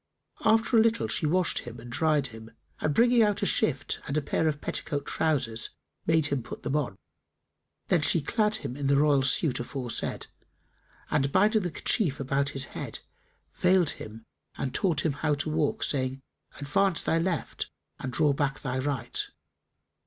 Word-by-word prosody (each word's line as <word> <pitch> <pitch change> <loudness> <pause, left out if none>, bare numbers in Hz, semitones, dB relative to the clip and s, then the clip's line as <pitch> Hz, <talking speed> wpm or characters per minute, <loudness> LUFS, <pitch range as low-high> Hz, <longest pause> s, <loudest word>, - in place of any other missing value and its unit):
After 225 +2 +3
a 225 - +7
little, 230 0 +2
she 155 - 0
washed 180 +3 +2
him 120 -1 -9
and 120 +1 -10
dried 150 +1 +2
him 110 -1 -11 0.3
and 155 - 0
bringing 240 +6 +4
out 210 -2 +2
a - - +3
shift 135 -2 +1
and 140 - -1
a - - +2
pair 160 - 0
of 150 -1 -1
petticoat 145 -1 -3
trousers 130 -8 0 0.4
made 160 -2 +3
him 140 -3 0
put - - -9
them 140 - -1
on. 140 -10 -1 0.9
Then 175 - +4
she 165 - +4
clad 210 +7 +1
him 125 - -4
in 140 -1 -2
the 140 - +4
royal 145 -1 +4
suit 135 +1 +2
aforesaid 120 0 -3 0.9
and, 140 -1 +1
binding 215 +5 +4
the 180 - -2
kerchief 160 - +1
about 140 +1 0
his 135 -2 0
head, - - -5 0.6
veiled 180 -3 +3
him 110 +1 -9 0.3
and 130 - -3
taught 165 -6 +1
him 155 - +2
how 150 +1 0
to 145 +2 -2
walk, 155 -2 0
saying, 130 -1 -1 0.4
"Advance 165 +6 +1
thy 165 - +2
left 170 -2 -2 0.3
and 130 - -4
draw 145 +3 +3
back 135 -1 -1
thy 130 -2 -2
right." 130 -3 -2
145 Hz, 175 wpm, -28 LUFS, 135-170 Hz, 0.9 s, a